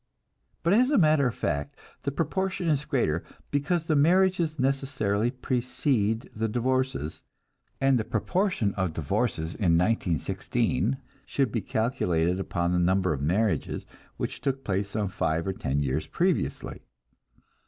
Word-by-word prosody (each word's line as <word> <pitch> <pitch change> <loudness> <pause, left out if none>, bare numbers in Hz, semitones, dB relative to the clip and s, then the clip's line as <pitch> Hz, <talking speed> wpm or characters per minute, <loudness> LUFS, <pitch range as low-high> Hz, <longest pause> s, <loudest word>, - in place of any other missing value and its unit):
But 170 +3 +3
as 250 +5 +5
a 290 - +3
matter 155 - +4
of 120 - -3
fact 70 0 -2 0.2
the 140 - -2
proportion 185 +4 -1
is 150 -1 +1
greater, 115 - 0 0.3
because 155 +4 0
the 155 - +1
marriages 170 +1 +3
necessarily 130 -5 0
precede 125 -3 0
the 110 +1 0
divorces, 130 - -1 0.6
and 135 -2 +3
the - - 0
proportion 145 - 0
of 95 -4 -1
divorces 80 +2 -1
in 85 -5 +2
1916 110 - 0 0.3
should 135 -5 0
be 115 - -1
calculated 90 -8 0
upon 85 -2 -1
the 90 - +2
number 95 0 +2
of 70 - -4
marriages 90 +2 0 0.3
which - - -4
took 135 -1 -1
place 100 0 -1
some 105 0 -1
five 85 -4 -1
or 95 - -1
ten 70 -4 -1
years 70 +3 -1
previously. - - -1
115 Hz, 140 wpm, -27 LUFS, 90-140 Hz, 0.6 s, as